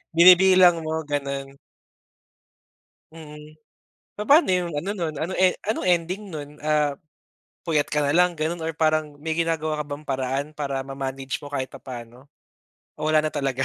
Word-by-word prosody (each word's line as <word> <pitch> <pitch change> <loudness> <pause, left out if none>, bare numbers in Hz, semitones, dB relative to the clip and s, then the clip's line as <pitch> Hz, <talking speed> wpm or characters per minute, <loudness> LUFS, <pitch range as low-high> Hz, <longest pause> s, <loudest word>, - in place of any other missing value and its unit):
Binibilang 180 -1 +7
mo 160 0 -2
ganun. 140 -1 -3 1.6
Mm, 155 -1 -12 0.6
papa'no 280 - +4
'yung 180 -2 0
ano 195 - -4
nun, 165 -4 -3
ano 175 +4 -3
e 185 -1 +4 0.2
anong 220 - -1
ending 180 +3 0
nun? 145 -2 -6 0.2
Ah, 150 -2 +1 0.7
puyat 150 -3 +1
ka 150 - 0
nalang 165 +4 +2
ganun 160 +2 -2
or 165 - -1
parang 155 -2 +1
may 160 +1 -3
ginagawa 155 -2 -1
ka - - -16
bang 145 +1 -7
paraan 135 +1 -2
para 140 -3 -3
ma-manage 135 0 -5
mo 145 - -9
kahit 135 -2 -2
papa'no 130 0 -11 0.7
o 155 - -1
wala 155 0 +3
na 155 - -1
talaga. 135 -2 -1
155 Hz, 150 wpm, -24 LUFS, 140-170 Hz, 1.6 s, Binibilang